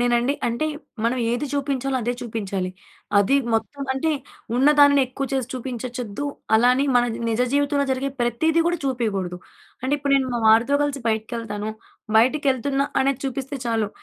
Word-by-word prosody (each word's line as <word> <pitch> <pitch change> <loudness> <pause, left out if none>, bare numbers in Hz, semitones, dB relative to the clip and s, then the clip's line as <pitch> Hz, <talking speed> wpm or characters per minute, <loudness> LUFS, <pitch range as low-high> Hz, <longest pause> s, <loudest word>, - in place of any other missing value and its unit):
నేనండి 245 +2 +2
అంటే 235 +6 0 0.4
మనం 240 +2 +1
ఏది 245 +5 -1
చూపించాలో 275 -2 -1
అదే 240 +2 0
చూపించాలి. 200 -6 -3 0.5
అది 205 +7 +4 0.2
మొత్తం 225 +6 -2
అంటే 270 +5 0 0.5
ఉన్నదాని 285 +1 +6
ఎక్కువ 270 +2 -4
చేసి 260 -3 -1
చూపించచ్చొద్దు 250 -1 -5 0.3
అలా 235 +3 +5
అని 270 +2 +1
మన 245 - +4 0.3
నిజ 225 +1 0
జీవితంలో 285 0 +2
జరిగే 265 +1 -1
ప్రతీది 310 +8 +2
కూడా 345 0 +1
చూపియకూడదు. 205 -9 -1 0.4
అంటే 260 +2 -1
ఇప్పుడు 285 -1 -1
నేను 265 -1 0
మా - - 0
వారితో 230 +5 +5
కలిసి 285 -1 -2
బయటికెళ్తాను. 220 -1 -3 0.5
బయటికెళ్తున్నా 270 +2 +2 0.2
అనేది 270 0 +1
చూపిస్తే 270 +1 -3
చాలు. 225 -3 0
255 Hz, 145 wpm, -23 LUFS, 230-280 Hz, 0.5 s, ఉన్నదాని